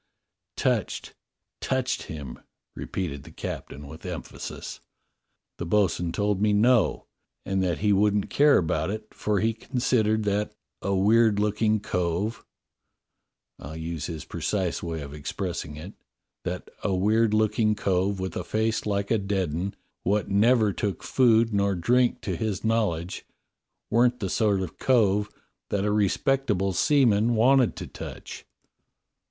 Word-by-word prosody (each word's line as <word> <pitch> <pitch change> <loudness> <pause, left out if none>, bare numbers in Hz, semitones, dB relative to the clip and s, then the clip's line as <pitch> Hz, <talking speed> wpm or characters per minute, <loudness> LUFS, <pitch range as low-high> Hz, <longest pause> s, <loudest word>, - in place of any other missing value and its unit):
" - - -60
Touched, - - -1 0.5
touched 130 -1 -1
him," 70 -5 -7 0.4
repeated 80 -7 -4
the - - -13
captain 70 +2 -7
with 80 +3 -11
emphasis. 90 -3 -7 0.8
"The 85 - -3
bo'sun 90 -3 +1
told 100 +1 0
me 105 -1 +3
'No' 115 +1 +3 0.4
and 95 0 0
that 90 -3 -1
he 105 - +5
wouldn't 105 +1 +2
care 145 0 +5
about 80 0 0
it, 110 +1 -6
for 105 -2 0
he 115 +1 +2
considered 110 -2 0
that 105 0 -1 0.3
'a 100 0 0
weird 110 +2 +4
looking 105 +1 +1
cove' 95 +4 -2 0.6
— - - -51
I'll 80 +3 -8
use 80 -2 -4
his 80 -3 -6
precise 95 -5 -2
way 80 -2 -4
of 70 0 -8
expressing 80 +1 -4
it 85 +7 -9 0.3
— - - -59
that - - -4
'a 100 -2 +1
weird 110 +3 +2
looking 110 0 +2
cove 95 0 0
with 95 0 -4
a - - -2
face 110 0 -1
like 100 -1 -1
a 115 - +3
dead 95 -4 -1
'un, 90 +5 -3 0.3
what 105 +2 0
never 110 +1 +4
took 100 0 -3
food 115 -3 +3
nor 100 -1 +2
drink 120 +8 +2
to - - -3
his 110 -4 -2
knowledge, 105 -7 -1 0.7
weren't 120 +2 +3
the 95 -5 -3
sort 105 -6 +2
of 90 - -6
cove 105 -5 +3 0.4
that 100 0 0
a 105 - +1
respectable 105 -1 +1
seaman 120 -3 +3
wanted 125 +2 +4
to - - -6
touch.'" - - -9
105 Hz, 145 wpm, -26 LUFS, 90-110 Hz, 0.8 s, he